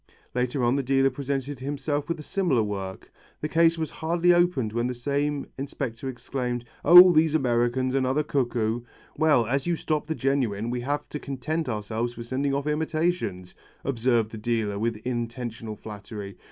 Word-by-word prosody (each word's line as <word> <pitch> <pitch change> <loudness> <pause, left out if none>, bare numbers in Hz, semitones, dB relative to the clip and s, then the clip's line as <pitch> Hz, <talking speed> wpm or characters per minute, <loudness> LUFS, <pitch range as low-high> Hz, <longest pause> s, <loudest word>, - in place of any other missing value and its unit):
Later 125 +1 0
on 120 +2 +3
the - - +1
dealer 135 +1 +2
presented 140 0 -3
himself 145 +2 -2
with 170 - -2
a - - -7
similar 165 - +1
work. 95 -2 -5 0.3
The 150 - -1
case 165 +1 +3
was 160 -1 -3
hardly 170 +2 +2
opened 175 -11 +2
when 120 +1 0
the 125 - -3
same 140 +3 -1
inspector 135 -2 -4
exclaimed, 125 -1 -3 0.2
"Oh 180 +1 +10
these 160 -1 +3
Americans! 130 -1 +1
Another 135 +2 +1
cuckoo." 120 -5 0 0.3
"Well, 150 -6 +4
as 135 +6 -1
you 175 - +2
stop 155 -2 -2
the 160 - -2
genuine 120 -6 0
we 125 0 -2
have 145 +4 -2
to 150 - -5
content 150 +3 -3
ourselves 110 +2 -3
with 115 - -6
sending 135 +3 -1
off 140 +1 -1
imitations," 155 - -1 0.3
observed 120 -3 +1
the 110 - -7
dealer 110 -3 -1
with 115 0 -1
intentional 120 -2 -4
flattery. 105 -2 -8
130 Hz, 165 wpm, -26 LUFS, 120-150 Hz, 0.3 s, Oh